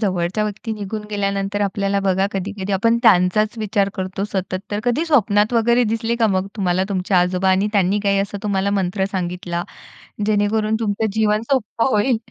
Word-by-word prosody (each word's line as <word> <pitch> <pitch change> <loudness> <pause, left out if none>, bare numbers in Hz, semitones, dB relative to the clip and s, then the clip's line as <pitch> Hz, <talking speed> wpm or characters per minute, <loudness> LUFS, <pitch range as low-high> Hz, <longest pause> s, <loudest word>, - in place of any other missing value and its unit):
जवळच्या 185 0 0
व्यक्ती 215 +2 -4
निघून 210 0 -5
गेल्यानंतर 200 0 -1
आपल्याला 200 0 0
बघा, 190 0 +1
कधी-कधी 195 +1 -4
आपण 230 +4 +2
त्यांचाच 215 +2 +3
विचार 205 -2 0
करतो 190 +1 -3
सतत 185 -1 -2
तर, 205 0 -2
कधी 250 +7 +1
स्वप्नात 210 -6 +3
वगैरे 235 +1 +3
दिसले 225 +1 -1
का 230 - +3
मग 190 -2 0
तुम्हाला 185 -1 +1
तुमचे 190 -1 -1
आजोबा 180 +1 +2
आणि 195 +3 +2
त्यांनी 200 0 +2
काही 200 0 +2
असा 200 +1 -2
तुम्हाला 200 -1 0
मंत्र 190 -1 0
सांगितला 175 -1 -3 0.6
जेणेकरून 215 +1 +1
तुमचं 215 0 0
जीवन 215 0 +2
सोपं 230 -3 0
होईल. 225 +3 +2
200 Hz, 165 wpm, -20 LUFS, 190-215 Hz, 0.6 s, त्यांचाच